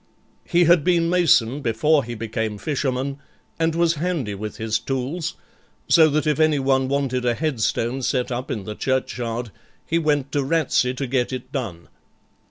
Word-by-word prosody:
He 175 Hz, -1 st, +3 dB
had 170 Hz, -2 st, +5 dB
been 170 Hz, -1 st, +2 dB
mason 145 Hz, -7 st, +3 dB
before 140 Hz, +5 st, +2 dB
he 120 Hz, +1 st, -6 dB
became 110 Hz, -1 st, -3 dB
fisherman, 135 Hz, +1 st, -2 dB, 0.4 s
and 165 Hz, 0 st, +1 dB
was 170 Hz, -1 st, +3 dB
handy 165 Hz, -, -1 dB
with 105 Hz, +2 st, -6 dB
his 110 Hz, -1 st, -1 dB
tools; 140 Hz, +6 st, -3 dB, 0.5 s
so 160 Hz, -2 st, +6 dB
that 155 Hz, +2 st, 0 dB
if 155 Hz, 0 st, +1 dB
anyone 135 Hz, -4 st, +2 dB
wanted 135 Hz, -2 st, -1 dB
a 120 Hz, -1 st, +1 dB
headstone 130 Hz, -3 st, -1 dB
set 125 Hz, 0 st, -1 dB
up 125 Hz, +1 st, -4 dB
in 105 Hz, -, -3 dB
the 105 Hz, -, -5 dB
churchyard, 120 Hz, -2 st, -2 dB, 0.3 s
he 165 Hz, -, +1 dB
went 145 Hz, -4 st, 0 dB
to 145 Hz, -1 st, 0 dB
Ratsey 135 Hz, -4 st, +1 dB
to 135 Hz, -, -3 dB
get 125 Hz, -1 st, 0 dB
it 130 Hz, 0 st, -6 dB
done. 105 Hz, -, -5 dB
135 Hz, 165 wpm, -22 LUFS, 120-155 Hz, 0.5 s, so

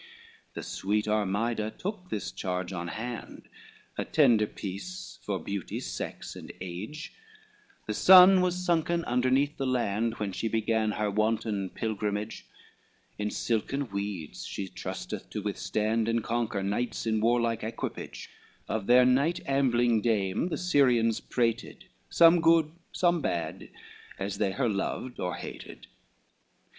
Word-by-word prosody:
XXVII -, -, -21 dB
The -, -, -5 dB
sweet 105 Hz, +2 st, -1 dB
Armida 105 Hz, +2 st, 0 dB
took 185 Hz, -2 st, -5 dB
this 105 Hz, -, -3 dB
charge 90 Hz, -1 st, -3 dB
on 85 Hz, -1 st, -4 dB
hand, 115 Hz, +6 st, -6 dB, 0.5 s
A -, -, +1 dB
tender 120 Hz, -8 st, +4 dB
piece, 105 Hz, -, -7 dB
for 100 Hz, -2 st, -2 dB
beauty, 100 Hz, -1 st, -4 dB
sex -, -, -6 dB
and -, -, -9 dB
age, 100 Hz, -, -6 dB, 0.7 s
The -, -, -2 dB
sun 185 Hz, 0 st, +8 dB
was 180 Hz, 0 st, 0 dB
sunken 170 Hz, 0 st, +1 dB
underneath 130 Hz, +4 st, +1 dB
the 135 Hz, -, -1 dB
land, 115 Hz, -2 st, 0 dB
When 105 Hz, -3 st, -3 dB
she 115 Hz, -, -2 dB
began 110 Hz, -1 st, +1 dB
her 105 Hz, -1 st, -1 dB
wanton 110 Hz, -2 st, 0 dB
pilgrimage, 105 Hz, 0 st, -3 dB, 0.7 s
In 105 Hz, 0 st, -1 dB
silken 120 Hz, +4 st, -1 dB
weeds 100 Hz, -4 st, -4 dB
she 100 Hz, -, -5 dB
trusteth -, -, -6 dB
to 105 Hz, -, -5 dB
withstand, 110 Hz, +2 st, -1 dB
And 115 Hz, -1 st, +1 dB
conquer 115 Hz, -4 st, -1 dB
knights 105 Hz, +6 st, -2 dB
in 110 Hz, -1 st, +1 dB
warlike 115 Hz, -1 st, +2 dB
equipage, 115 Hz, +1 st, -6 dB, 0.4 s
Of 110 Hz, -3 st, -2 dB
their 125 Hz, +1 st, +7 dB
night 140 Hz, +7 st, +2 dB
ambling 120 Hz, -4 st, +2 dB
dame 105 Hz, -, +1 dB
the -, -, -2 dB
Syrians 125 Hz, -10 st, +3 dB
prated, 115 Hz, -2 st, -2 dB, 0.2 s
Some 170 Hz, 0 st, +6 dB
good, 165 Hz, -2 st, +4 dB, 0.2 s
some 175 Hz, -2 st, +2 dB
bad, 85 Hz, -, -3 dB, 0.5 s
as 100 Hz, 0 st, -4 dB
they 100 Hz, -3 st, +1 dB
her 130 Hz, +2 st, 0 dB
loved 115 Hz, +4 st, -3 dB
or 90 Hz, -2 st, -2 dB
hated. -, -, -9 dB
115 Hz, 135 wpm, -29 LUFS, 105-135 Hz, 0.7 s, sun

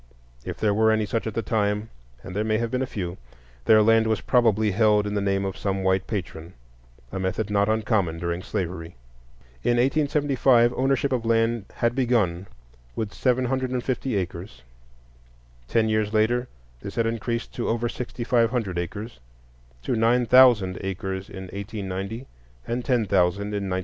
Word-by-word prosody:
If -, -, -6 dB
there 105 Hz, -2 st, +1 dB
were 110 Hz, +1 st, +3 dB
any 110 Hz, -1 st, +2 dB
such 115 Hz, +2 st, -2 dB
at 110 Hz, -, -5 dB
that 115 Hz, -, -2 dB
time,—and 100 Hz, -, -3 dB
there 105 Hz, -, 0 dB
may 110 Hz, 0 st, +1 dB
have 115 Hz, 0 st, -2 dB
been 130 Hz, -, -1 dB
a 130 Hz, -, -1 dB
few,—their 65 Hz, -, -1 dB
land 115 Hz, +1 st, +4 dB
was 110 Hz, -1 st, +1 dB
probably 110 Hz, -4 st, +2 dB
held 105 Hz, +1 st, +3 dB
in 105 Hz, -, -3 dB
the 100 Hz, -, 0 dB
name 100 Hz, 0 st, 0 dB
of 95 Hz, -, -3 dB
some 95 Hz, -1 st, -2 dB
white 95 Hz, 0 st, +1 dB
patron,—a -, -, -8 dB
method 95 Hz, +3 st, -2 dB
not 100 Hz, 0 st, +2 dB
uncommon 110 Hz, -6 st, 0 dB
during 85 Hz, +1 st, -3 dB
slavery. 85 Hz, -2 st, -4 dB, 0.7 s
In 120 Hz, -, +2 dB
1875 135 Hz, -3 st, +3 dB
ownership 135 Hz, +1 st, +1 dB
of 125 Hz, -3 st, 0 dB
land 115 Hz, -1 st, +1 dB
had 120 Hz, 0 st, +1 dB
begun 110 Hz, -9 st, 0 dB, 0.5 s
with 110 Hz, -2 st, -3 dB
seven 130 Hz, 0 st, +1 dB
hundred 130 Hz, +1 st, -1 dB
and 125 Hz, -1 st, -2 dB
fifty 130 Hz, -2 st, -2 dB
acres; 85 Hz, -9 st, -5 dB, 1.0 s
ten 110 Hz, -, +2 dB
years 110 Hz, -1 st, 0 dB
later 120 Hz, +3 st, +1 dB, 0.3 s
this -, -, -7 dB
had 115 Hz, -, +1 dB
increased 115 Hz, +1 st, -3 dB
to -, -, -3 dB
over 120 Hz, +1 st, 0 dB
sixty 120 Hz, 0 st, -5 dB
five 115 Hz, -1 st, +3 dB
hundred 105 Hz, -8 st, -2 dB
acres, 105 Hz, -, -6 dB, 0.6 s
to -, -, -1 dB
nine 120 Hz, +2 st, +3 dB
thousand 115 Hz, -7 st, +5 dB
acres 95 Hz, 0 st, -4 dB
in 95 Hz, -1 st, -8 dB
1890 100 Hz, +3 st, -5 dB, 0.4 s
and 120 Hz, +1 st, -2 dB
ten 120 Hz, -4 st, +1 dB
thousand 100 Hz, +2 st, +1 dB
in 100 Hz, -1 st, -2 dB
1900. 95 Hz, 0 st, 0 dB
110 Hz, 165 wpm, -24 LUFS, 95-120 Hz, 1.0 s, thousand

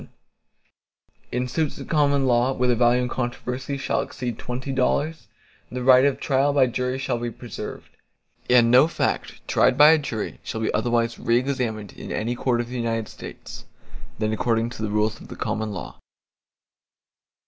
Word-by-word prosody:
VII -, -, -12 dB, 1.2 s
In 125 Hz, +1 st, -1 dB
suits 155 Hz, +3 st, -1 dB
at -, -, -8 dB
common 145 Hz, -3 st, +2 dB
law, 125 Hz, +1 st, +3 dB
where 125 Hz, -1 st, 0 dB
the 125 Hz, -, +3 dB
value 120 Hz, +1 st, +3 dB
in -, -, -1 dB
controversy 125 Hz, +2 st, -3 dB
shall 135 Hz, -, 0 dB
exceed 125 Hz, -4 st, -5 dB
twenty 125 Hz, +3 st, -4 dB
dollars, 145 Hz, +4 st, 0 dB, 0.4 s
the 125 Hz, 0 st, -4 dB
right 130 Hz, +1 st, +7 dB
of 140 Hz, -, +1 dB
trial 140 Hz, +1 st, +2 dB
by 140 Hz, -2 st, +5 dB
jury 125 Hz, +1 st, -2 dB
shall 130 Hz, -2 st, -2 dB
be 120 Hz, 0 st, -3 dB
preserved, -, -, -8 dB, 0.6 s
and 120 Hz, -2 st, +5 dB
no 130 Hz, +5 st, +7 dB
fact 165 Hz, -, -3 dB
tried 130 Hz, -, +3 dB
by 150 Hz, +2 st, +9 dB
a 160 Hz, -, +5 dB
jury 115 Hz, -7 st, -4 dB
shall 110 Hz, -, -4 dB
be 110 Hz, -, -1 dB
otherwise 115 Hz, -1 st, 0 dB
re 115 Hz, 0 st, +2 dB
examined 120 Hz, -6 st, -2 dB
in -, -, -9 dB
any 115 Hz, +3 st, -1 dB
court 120 Hz, 0 st, 0 dB
of 120 Hz, 0 st, -3 dB
the 125 Hz, -, -5 dB
United 115 Hz, -2 st, -2 dB
States, -, -, -10 dB, 0.5 s
than 110 Hz, 0 st, -1 dB
according 115 Hz, +1 st, 0 dB
to 120 Hz, -, -8 dB
the 110 Hz, -, -1 dB
rules 105 Hz, +1 st, 0 dB
of -, -, -11 dB
the -, -, -9 dB
common 110 Hz, 0 st, -2 dB
law. 95 Hz, -5 st, -7 dB
125 Hz, 180 wpm, -24 LUFS, 115-135 Hz, 1.2 s, by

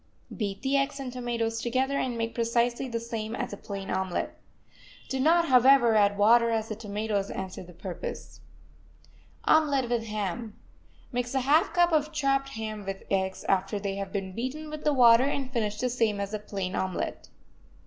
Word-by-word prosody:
Beat 200 Hz, -2 st, -3 dB
the 275 Hz, +1 st, +2 dB
eggs 275 Hz, +1 st, 0 dB
and 255 Hz, -2 st, -5 dB
tomatoes 230 Hz, -2 st, -2 dB
together, 260 Hz, +4 st, 0 dB
and 245 Hz, -2 st, -2 dB
make 230 Hz, 0 st, -2 dB
precisely 235 Hz, +2 st, 0 dB
the 230 Hz, -1 st, -2 dB
same 225 Hz, -1 st, -4 dB
as -, -, -4 dB
a -, -, -3 dB
plain 195 Hz, -1 st, -6 dB
omelet. 190 Hz, -2 st, -2 dB, 0.7 s
Do 265 Hz, -, -2 dB
not, 335 Hz, +5 st, +4 dB
however, 255 Hz, -2 st, +6 dB
add 205 Hz, -1 st, +3 dB
water, 230 Hz, +3 st, +5 dB
as 225 Hz, -1 st, -1 dB
the 215 Hz, -, -3 dB
tomatoes 205 Hz, -1 st, -2 dB
answer 190 Hz, -1 st, -5 dB
the 180 Hz, -1 st, -12 dB
purpose. 175 Hz, 0 st, -7 dB, 1.1 s
OMELET 280 Hz, -6 st, +3 dB
WITH 235 Hz, -2 st, 0 dB
HAM 215 Hz, +1 st, -4 dB, 0.6 s
Mix 245 Hz, 0 st, -2 dB
a 265 Hz, -, +2 dB
half 290 Hz, +6 st, +3 dB
cup 350 Hz, 0 st, +3 dB
of 305 Hz, -1 st, +2 dB
chopped 275 Hz, -3 st, +1 dB
ham 215 Hz, -3 st, -5 dB
with 195 Hz, 0 st, -5 dB
the -, -, -3 dB
eggs 190 Hz, -1 st, -1 dB
after 195 Hz, +2 st, 0 dB
they 195 Hz, -1 st, -3 dB
have 195 Hz, -1 st, -4 dB
been 190 Hz, -2 st, -4 dB
beaten 275 Hz, +8 st, -4 dB
with 305 Hz, -1 st, -6 dB
the 300 Hz, -, +4 dB
water, 245 Hz, -1 st, +6 dB
and 275 Hz, -2 st, -2 dB
finish 210 Hz, -4 st, -1 dB
the 255 Hz, -, +1 dB
same 230 Hz, -4 st, 0 dB
as 200 Hz, +1 st, -4 dB
a 215 Hz, -, -2 dB
plain 195 Hz, -3 st, -4 dB
omelet. 185 Hz, -1 st, -3 dB
230 Hz, 185 wpm, -28 LUFS, 205-265 Hz, 1.1 s, however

